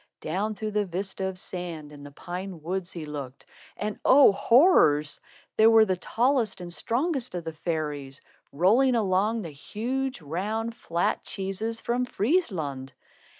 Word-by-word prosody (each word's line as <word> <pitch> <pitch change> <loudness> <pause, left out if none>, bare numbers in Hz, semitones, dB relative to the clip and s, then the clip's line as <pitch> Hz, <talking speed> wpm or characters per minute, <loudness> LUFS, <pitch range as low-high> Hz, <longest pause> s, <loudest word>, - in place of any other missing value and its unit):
Down 205 +7 -2
through 215 +1 -4
the 210 -1 0
vista 190 +2 -3
of 190 -1 -5
sand, 175 -5 -6
in 145 -1 -12
the 145 - -9
pine 180 +2 -7
woods, 185 +2 -3
he 165 -3 -6
looked, 140 -3 -7 0.3
and 210 0 -4
oh, 270 -3 +7
horrors! 195 - +4 0.4
There 220 +1 +7
were 225 -1 +7
the 190 -3 0
tallest 235 +2 0
and 175 -1 -6
strongest 255 - -1
of 175 - -3
the 160 0 -5
fairies 150 -4 -4 0.3
rolling 225 - +4
along 210 +1 +1
the 165 - -7
huge, 255 - -3
round, 210 +9 -3
flat 170 -5 -1
cheeses 200 +4 -4
from 245 +1 0
Friesland! 185 - -1
190 Hz, 150 wpm, -26 LUFS, 160-225 Hz, 0.4 s, oh